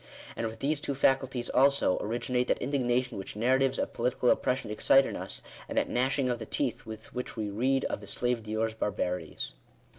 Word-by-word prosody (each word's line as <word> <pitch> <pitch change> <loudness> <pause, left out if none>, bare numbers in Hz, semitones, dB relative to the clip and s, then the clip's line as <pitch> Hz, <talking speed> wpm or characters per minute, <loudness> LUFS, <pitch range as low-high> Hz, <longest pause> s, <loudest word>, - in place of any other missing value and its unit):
And 115 - -1
with 110 0 -8
these 145 +2 +1
two 140 -1 -3
faculties 130 -2 +1
also, 140 -8 +4
originate 125 +3 -1
that - - +2
indignation 125 -3 0
which 95 - -7
narratives 130 +4 +2
of - - -2
political 125 +1 +2
oppres 125 - 0
sion 130 - -7
excite 135 +5 +5
in - - -4
us, - - -4 0.3
and - - -4
that - - +2
gnashing 130 +2 +1
of 120 -2 -1
the 110 - -7
teeth 130 -6 -2
with 110 0 -9
which 125 -1 -5
we 105 -2 -2
read 130 +6 +1
of - - -2
the 100 - -11
slave 120 +3 0
dealers 110 +1 -1
barbarities. 90 - -3
125 Hz, 200 wpm, -29 LUFS, 110-135 Hz, 0.3 s, excite